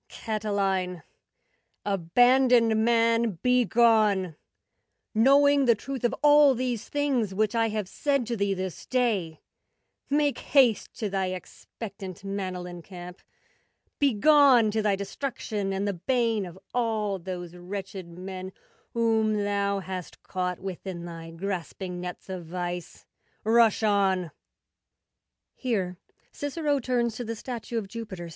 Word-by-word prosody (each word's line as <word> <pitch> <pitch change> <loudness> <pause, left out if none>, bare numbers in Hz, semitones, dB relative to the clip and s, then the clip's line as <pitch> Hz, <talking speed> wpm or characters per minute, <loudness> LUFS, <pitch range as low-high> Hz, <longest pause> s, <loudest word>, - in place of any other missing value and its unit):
Catiline, 195 -5 -2 0.8
abandoned 230 +4 +4
man, 230 -3 +2
begone! 220 -6 +3 0.8
Knowing 280 +4 +5
the 235 -2 +5
truth 265 +3 -6
of 240 - +1
all 295 -2 +7
these 240 -2 -3
things 265 -9 0
Which 215 +2 +1
I 225 -1 +2
have 210 -3 -3
said 275 +4 0
to 235 - -2
thee 200 -2 0
this 185 -1 -5
day. 210 -11 0 0.7
Make 290 -2 +1
haste! 255 -7 +3
To 215 - -2
thy 190 -1 0
expectant 190 +1 -8
Manlian 180 -3 -5
camp— 180 0 -10 0.8
Begone! 275 -3 +5
To 220 +1 0
thy 210 -2 +2
destruction 200 -1 -4
and 195 +1 -1
the 200 - 0
bane 225 +1 0
Of 175 +1 -11 0.2
all 220 -5 0
those 175 -1 -6
wretched 190 0 -6
men 185 +2 -7 0.4
Whom 220 -2 +2
thou 200 -1 0
hast 185 -2 -7
caught 180 -1 -2
Within 185 -2 -6
thy 165 -1 -8
grasping 180 +1 -5
nets 180 0 -7
of 185 -3 -6
vice— 175 0 -5 0.4
Rush 225 0 +4
on! 190 -5 +2
205 Hz, 105 wpm, -27 LUFS, 185-235 Hz, 0.8 s, all